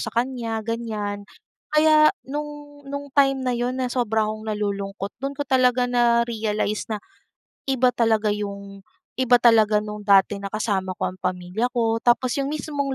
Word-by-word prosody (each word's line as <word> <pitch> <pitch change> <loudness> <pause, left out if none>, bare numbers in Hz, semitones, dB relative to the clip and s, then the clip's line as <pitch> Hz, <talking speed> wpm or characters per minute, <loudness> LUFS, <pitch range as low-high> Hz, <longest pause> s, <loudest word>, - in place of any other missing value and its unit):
sa - - -3
kanya, 235 -2 -2
ganyan. 210 -3 -4 0.4
Kaya 305 0 +5 0.2
nung 290 +1 -7
nung 285 0 -5
time 270 -2 +3
na 250 - +1
yun 245 +2 -2
na 255 - 0
sobra 225 -3 0
akong 215 0 -5
nalulungkot, 200 -2 -4
dun 275 0 -4
ko 290 - -2
talaga 250 -1 +3
na-realize 235 -3 0
na, 215 - -1 0.7
iba 260 -2 +3
talaga 225 -3 +1
yung 200 -1 -6 0.3
iba 255 -1 +4
talaga 220 -3 +5
nung 210 -1 -7
dati 200 0 +4
na 200 - -6
kasama 195 -3 -2
ko - - -2
ang 185 - -14
pamilya 180 +4 -2
ko 225 -1 +1
tapos 245 +2 +2
yung 275 0 -1
mismong 285 -2 -3
230 Hz, 160 wpm, -23 LUFS, 210-260 Hz, 0.7 s, Kaya